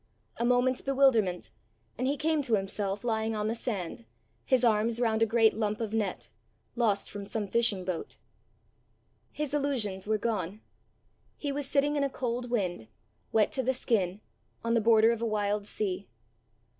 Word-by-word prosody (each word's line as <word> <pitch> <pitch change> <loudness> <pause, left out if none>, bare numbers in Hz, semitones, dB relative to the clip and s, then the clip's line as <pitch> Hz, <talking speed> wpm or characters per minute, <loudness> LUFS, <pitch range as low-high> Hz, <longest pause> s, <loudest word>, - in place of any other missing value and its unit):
A 235 - 0
moment's 250 +1 +2
bewilderment, 260 -10 +2 0.4
and 255 +3 -1
he 285 +2 0
came 315 0 +1
to 240 -5 +2
himself 195 +1 -2
lying 220 -1 0
on 210 0 -1
the 220 - 0
sand, 200 - -4 0.4
his 255 -1 +2
arms 225 0 +2
round 225 -2 +1
a 225 - +4
great 225 0 +4
lump 215 -1 -1
of 220 -2 -3
net, 210 -4 -2 0.5
lost 220 -4 0
from 205 -1 -6
some 205 +1 -3
fishing 205 -4 +3
boat. 180 -3 -4 1.1
His 295 -2 -3
illusions 235 -10 -1
were 215 0 +2
gone. 210 -2 -2 0.8
He 285 - -3
was 280 -1 -1
sitting 290 +1 +2
in 285 - +1
a 280 - +1
cold 245 -1 -3
wind, 180 - -2 0.4
wet 220 -1 +3
to 265 - +1
the 260 +1 0
skin, 205 -5 0 0.4
on 230 0 0
the 230 - +3
border 225 0 +5
of 230 -1 -3
a 230 - 0
wild 205 -1 -1
sea. 200 -2 -3
225 Hz, 170 wpm, -29 LUFS, 205-245 Hz, 1.1 s, border